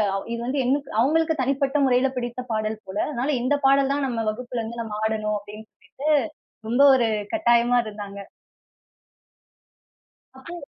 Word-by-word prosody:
அவ் 195 - -4
இது 235 - -4
வந்து 270 +2 -1
எங் 260 - +3 0.3
அவங்களுக்கு 320 +4 +2
தனிப்பட்ட 275 +2 0
முறையில 255 +1 +3
பிடித்த 240 0 -4
பாடல் 215 0 -2
போல. 190 - -6
அதனால 275 +1 -1
"இந்த 275 +3 +2
பாடல் 275 0 +3
தான் 285 -1 -1
நம்ம 230 -3 -2
வகுப்புல 245 +1 -5
இருந்து 230 +1 -5
நம்ம 210 -2 -6
ஆடணும்." 215 -1 -1
அப்படின்னு 210 +2 -12
சொல்லிட்டு 290 +3 -6 0.6
ரொம்ப 245 +4 +2
ஒரு 245 - +2 0.3
கட்டாயமா 240 -5 +3
இருந்தாங்க. 205 -1 -8 2.2
அப்போ 340 +5 -9
245 Hz, 145 wpm, -24 LUFS, 220-275 Hz, 2.2 s, எங்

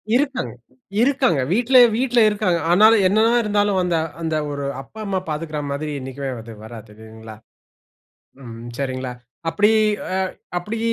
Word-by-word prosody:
இருக்காங்க. 270 - -1 0.5
இருக்காங்க. 250 - +2
வீட்ல 245 +4 +3 0.2
வீட்ல 245 0 +1
இருக்காங்க. 205 -5 0
ஆனாலும் 215 +2 +6
என்ன 200 +3 +1
தான் 240 +1 +3
இருந்தாலும் 205 -2 +1
அந்த 175 -2 0 0.3
அந்த 160 -1 -1 0.2
ஒரு 140 0 -4 0.2
அப்பா, 215 +11 -14
அம்மா 195 -2 -1
பார்த்துக்கிற 155 0 -4
மாதிரி 150 +2 -3
என்னைக்குமே 135 +1 -5 0.4
வராதுங்களா. 110 0 -12 1.1
ம். 115 -1 -9
சரிங்களா? 130 -2 -3 0.4
அப்படி 205 +5 +3 0.4
அ - - 0 0.4
அப்படி 210 +6 -5
175 Hz, 125 wpm, -21 LUFS, 135-215 Hz, 1.1 s, ஆனாலும்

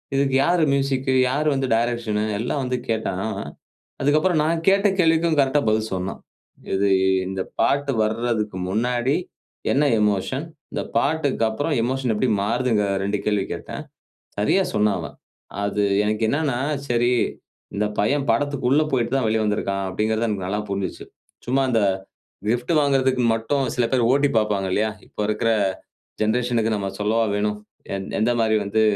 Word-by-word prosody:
இதுக்கு 135 -1 +2
யாரு 175 -1 +3
மியூசிக்? 135 -1 0 0.2
யாரு 145 +4 0
வந்து 135 -1 -1
டைரக்ஷன்? 115 -2 0 0.2
எல்லாம் 125 +5 -1
வந்து 125 0 -1
கேட்டான், 100 -4 -1 0.8
அதுக்கப்புறம் 155 +4 +3
நான் 165 +1 0
கேட்ட 195 +2 +5
கேள்விக்கும் 165 -1 +3
கரெக்ட்டா 140 +1 +3
பதில் 110 0 0
சொன்னான். 95 +1 -3 0.5
இது 100 +1 +2 0.4
இந்த 95 0 -3 0.2
பாட்டு 140 0 +2
வர்றதுக்கு 110 -2 -1
முன்னாடி 120 +6 +1 0.6
என்ன 140 - +3 0.2
எமோஷன்? 105 - 0 0.3
இந்த - - -2
பாட்டுக்கப்புறம் 145 -2 +1
எமோஷன் 130 0 -1
எப்பிடி 115 +4 0
மாறுதுங்கிற 115 -2 +1
2 100 +1 0
கேள்வி 105 -2 +1
கேட்டேன். - - -7 0.6
சரியா 105 - +3
சொன்னான் 105 -1 +2
அவன். - - -8 0.5
அது 100 0 0 0.2
எனக்கு 105 +1 -1
என்னன்னா 140 -2 0 0.3
சரி, 120 0 +2 0.6
இந்த 105 +1 0
பையன் 140 +7 +1
படத்துக்குள்ள 140 +3 +2
போயிட்டுதான் 125 0 +1
வெளிய 110 0 +1
வந்திருக்கிறான். 100 -2 -1
அப்பிடிங்கிறது 110 +4 0
எனக்கு 100 -4 -2
நல்லா 105 +3 -1
புரிஞ்சிச்சு. 100 -2 -3 0.4
சும்மா 135 +2 +2
அந்த 115 -2 +2 0.7
கிஃப்ட் 120 +5 0
வாங்குறதுக்கு 135 -3 +2
மட்டும் 135 +5 0
சில 125 - +1
பேர் 125 -3 +2
ஓட்டிப் 140 -2 +2
பாப்பாங்க 105 -3 0
இல்லயா! 110 +3 +1 0.2
இப்ப - - -29
இருக்கிற 110 +1 +1 0.7
ஜெனரேஷன்க்கு 115 0 +1
நம்ம 100 -1 -2
சொல்லவா 110 +2 +2
வேணும்? 105 0 -1 0.4
எ - - -1 0.2
எந்த 110 +3 +2
மாதிரி 110 -1 +3
வந்து 100 +2 0
120 Hz, 140 wpm, -22 LUFS, 105-135 Hz, 0.8 s, கேட்ட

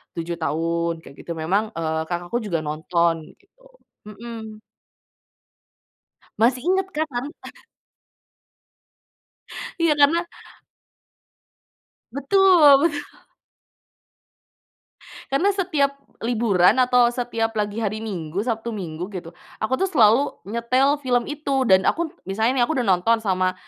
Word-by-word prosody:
7 170 0 -4
tahun 165 +2 -2
kayak 140 - -14
gitu 170 - -8
memang, 180 +7 0
eee, 160 -1 -2
kakakku 175 +6 -3
juga 190 -8 -2
nonton 165 +2 0 0.2
gitu. 390 +5 -34 0.5
Mhm. 220 0 -9 1.8
Masih 250 +2 +3
inget 385 0 +1
kan 315 +1 0
tan 240 +2 -2 2.5
Iya, 330 -2 +3
karena 315 +4 +3 1.9
Betul 295 -1 +5
betul. 290 -3 +1 2.3
Karena 370 +9 +2
setiap 300 -8 0 0.3
liburan 225 -3 +3
atau 245 -1 +4
setiap 230 -2 -2
lagi 210 0 -2
hari 215 +1 -2
Minggu, 180 -5 -4
Sabtu 230 0 -3
Minggu 175 -4 -5
gitu, 170 -3 -6 0.3
aku 220 +4 +1
tuh 385 - +1
selalu 260 - +3 0.2
nyetel 255 +5 +1
film 245 +1 0
itu, 280 -3 -1
dan 190 0 +5
aku 335 -1 0 0.2
misalnya 220 +7 0
nih 240 - +4
aku 320 - -2
udah 240 - -1
nonton 195 +5 +3
sama 185 -2 0
230 Hz, 110 wpm, -22 LUFS, 180-280 Hz, 2.5 s, Betul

